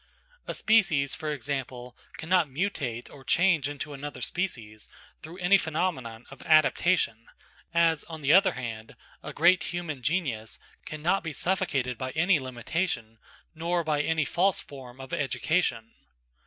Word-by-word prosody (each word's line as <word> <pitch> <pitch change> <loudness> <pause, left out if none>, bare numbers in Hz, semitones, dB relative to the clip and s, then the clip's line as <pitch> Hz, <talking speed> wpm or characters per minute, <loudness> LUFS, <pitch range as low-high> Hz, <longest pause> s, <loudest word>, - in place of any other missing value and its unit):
A - - -3
species, 170 -11 +3
for 155 -1 -4
example, 130 -3 -4 0.2
cannot 170 0 +2
mutate 135 - -3
or 140 - -13
change 165 -3 +3
into 145 +1 -6
another 140 -2 -6
species 115 - -3 0.3
through 165 +3 -10
any 190 +2 +4
phenomenon 140 -9 -2
of 135 - -12
adaptation, 155 -6 +3 0.4
as, 165 -2 +3
on 160 -2 -9
the 140 +3 +4
other 195 +1 +6
hand, 115 -3 -7 0.3
a - - -7
great 175 +4 +4
human 170 -6 -4
genius 130 -8 -1 0.3
cannot 160 +5 0
be 165 -2 -4
suffocated 135 -9 -1
by 130 - -3
any 175 +1 +3
limitation, 125 -2 -3 0.3
nor 170 +1 -1
by 150 -2 +1
any 160 -1 +1
false 185 +5 +2
form 130 -2 -10
of 130 -1 -9
education. 135 -4 0
150 Hz, 140 wpm, -28 LUFS, 130-175 Hz, 0.4 s, other